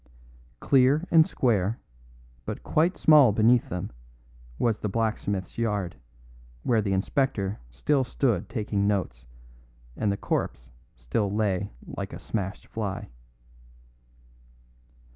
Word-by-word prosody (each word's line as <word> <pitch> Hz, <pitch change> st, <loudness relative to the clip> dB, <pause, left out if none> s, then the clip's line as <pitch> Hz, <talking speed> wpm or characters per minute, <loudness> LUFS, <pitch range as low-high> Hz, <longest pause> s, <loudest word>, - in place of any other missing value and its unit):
Clear 135 Hz, +5 st, +3 dB
and 160 Hz, -1 st, +6 dB
square, 110 Hz, -4 st, +1 dB, 0.6 s
but -, -, -6 dB
quite 170 Hz, +4 st, +1 dB
small 150 Hz, -7 st, +7 dB
beneath 115 Hz, +3 st, +3 dB
them, 90 Hz, 0 st, -4 dB, 0.7 s
was 115 Hz, -3 st, +1 dB
the 105 Hz, -, -2 dB
blacksmith's 100 Hz, -3 st, -2 dB
yard, 105 Hz, -, -1 dB, 0.7 s
where 115 Hz, -3 st, +2 dB
the 100 Hz, -1 st, -2 dB
inspector 100 Hz, 0 st, 0 dB
still 130 Hz, -, +1 dB
stood 120 Hz, -7 st, 0 dB
taking 105 Hz, -3 st, -1 dB
notes 75 Hz, -12 st, -2 dB, 0.7 s
and 105 Hz, -, 0 dB
the 100 Hz, -, -2 dB
corpse 60 Hz, -8 st, -3 dB, 0.3 s
still 80 Hz, -, -1 dB
lay 100 Hz, -2 st, 0 dB, 0.2 s
like -, -, -6 dB
a -, -, -7 dB
smashed 100 Hz, -2 st, -4 dB
fly. 100 Hz, -3 st, -4 dB
105 Hz, 110 wpm, -26 LUFS, 95-120 Hz, 0.7 s, small